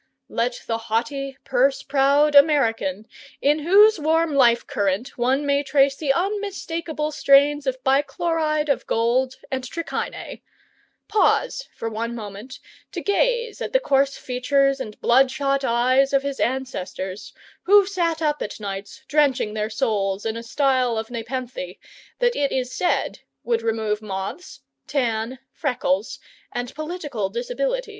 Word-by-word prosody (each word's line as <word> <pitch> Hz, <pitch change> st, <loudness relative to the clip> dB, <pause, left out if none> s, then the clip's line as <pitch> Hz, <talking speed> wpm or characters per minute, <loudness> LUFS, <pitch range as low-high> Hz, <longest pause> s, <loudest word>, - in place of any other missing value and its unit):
Let 240 Hz, +1 st, -2 dB
the 225 Hz, -1 st, -2 dB
haughty, 265 Hz, +5 st, -2 dB
purse 265 Hz, +1 st, +1 dB
proud 280 Hz, +2 st, +3 dB
American 225 Hz, -, +3 dB, 0.3 s
in 295 Hz, +2 st, +2 dB
whose 400 Hz, +5 st, +5 dB
warm 320 Hz, +1 st, +1 dB
life 240 Hz, -4 st, +4 dB
current 200 Hz, +5 st, -2 dB
one 260 Hz, +4 st, +1 dB
may 280 Hz, 0 st, +2 dB
trace 275 Hz, -1 st, +3 dB
the 285 Hz, -1 st, 0 dB
unmistakable 335 Hz, -4 st, -2 dB
strains 285 Hz, 0 st, +4 dB
of 260 Hz, 0 st, -2 dB
bichloride 305 Hz, +3 st, +1 dB
of 280 Hz, -, 0 dB
gold 250 Hz, +3 st, +1 dB, 0.2 s
and 260 Hz, -1 st, -2 dB
trichinae 330 Hz, +6 st, -5 dB, 0.7 s
pause 435 Hz, +3 st, +1 dB
for -, -, -4 dB
one 230 Hz, +1 st, -3 dB
moment 210 Hz, +3 st, -8 dB, 0.4 s
to -, -, -4 dB
gaze 470 Hz, +3 st, 0 dB
at -, -, -4 dB
the -, -, +5 dB
coarse 275 Hz, -, +1 dB
features 275 Hz, +2 st, +1 dB
and 215 Hz, -5 st, -7 dB
bloodshot 270 Hz, +2 st, +2 dB
eyes 255 Hz, +3 st, +2 dB
of 275 Hz, 0 st, +3 dB
his 280 Hz, -1 st, -4 dB
ancestors, 205 Hz, -7 st, -3 dB, 0.3 s
who 405 Hz, +1 st, +6 dB
sat 340 Hz, -4 st, -1 dB
up 295 Hz, -1 st, 0 dB
at 205 Hz, -, -5 dB
nights 200 Hz, +5 st, -7 dB
drenching 280 Hz, -8 st, +2 dB
their 215 Hz, 0 st, -2 dB
souls 210 Hz, -5 st, -1 dB
in 220 Hz, 0 st, -1 dB
a 230 Hz, -, -5 dB
style 255 Hz, -1 st, +1 dB
of 220 Hz, +2 st, -4 dB
nepenthe 235 Hz, -5 st, -5 dB, 0.4 s
that 485 Hz, -1 st, +1 dB
it 280 Hz, -1 st, 0 dB
is 255 Hz, -1 st, -2 dB
said 355 Hz, -, 0 dB, 0.2 s
would 230 Hz, -1 st, 0 dB
remove 220 Hz, -2 st, -1 dB
moths, 195 Hz, -, -6 dB, 0.3 s
tan, 240 Hz, -3 st, -1 dB, 0.2 s
freckles, 220 Hz, -, -1 dB, 0.3 s
and 245 Hz, 0 st, -4 dB
political 300 Hz, -, -4 dB
disabilities. -, -, -2 dB
270 Hz, 135 wpm, -23 LUFS, 230-300 Hz, 0.7 s, who